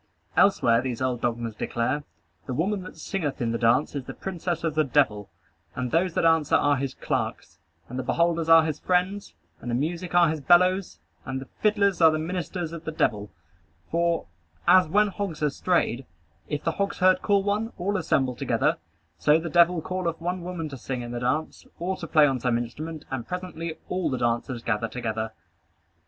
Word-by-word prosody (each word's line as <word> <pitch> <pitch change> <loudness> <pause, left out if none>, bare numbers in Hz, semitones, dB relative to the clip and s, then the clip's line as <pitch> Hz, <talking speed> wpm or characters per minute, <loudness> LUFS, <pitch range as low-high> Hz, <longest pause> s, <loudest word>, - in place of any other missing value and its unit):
Elsewhere, 125 -12 +4
these 125 -3 -3
old 130 -2 -1
dogmas 115 -1 -2
declare 120 +6 -2 0.4
"The 130 - -3
woman 190 +6 0
that 185 - -10
singeth 160 -3 -3
in 115 -2 0
the 115 - -2
dance 120 +5 +3
is 140 -3 -4
the - - -8
princess 175 -3 -4
of 165 -2 0
the 155 +1 +3
devil; 125 -8 +1 0.5
and 125 -1 -3
those 175 +1 +1
that - - +2
answer 160 -2 +4
are 145 -1 +3
his 135 0 -3
clerks; - - -3 0.3
and 125 +2 -5
the - - -2
beholders 170 -1 +1
are 165 -1 +8
his 155 -2 -2
friends, 185 +3 0 0.2
and 120 - -7
the 120 - 0
music 170 +6 -2
are 175 -1 +6
his 155 -1 -3
bellows, 180 +5 +3 0.3
and 130 0 -4
the 135 - -8
fiddlers 200 +1 +1
are 160 - +8
the 155 - 0
ministers 170 0 -4
of 165 - -7
the 160 - -3
devil; 105 -9 0 0.6
for, 170 0 +1 0.4
as 185 0 +6
when 210 +6 +3
hogs 195 -6 -4
are 150 - +2
strayed, 135 -6 0 0.4
if 150 0 -3
the 165 - +1
hogs' 200 +3 -2
herd 185 0 +4
call 200 -2 +2
one, 210 +3 -1
all 195 +3 -1
assemble 135 -8 +1
together, - - +1 0.4
so 150 - +5
the 165 0 -4
devil 170 -1 +4
calleth 170 -2 -2
one 180 +2 -3
woman 175 -2 -4
to 140 -3 -8
sing 125 -1 -4
in 120 - -7
the 120 - -3
dance, 130 +6 -2
or 180 +3 -2
to 170 - -7
play 155 -2 +5
on 135 -3 +1
some 120 -1 +1
instrument, 150 +7 -6
and 130 -3 -4
presently 170 -3 -5
all 180 -3 -1
the 130 - -1
dancers 120 +1 -1
gather 115 0 0
together." 110 -2 -3
160 Hz, 195 wpm, -26 LUFS, 130-180 Hz, 0.6 s, are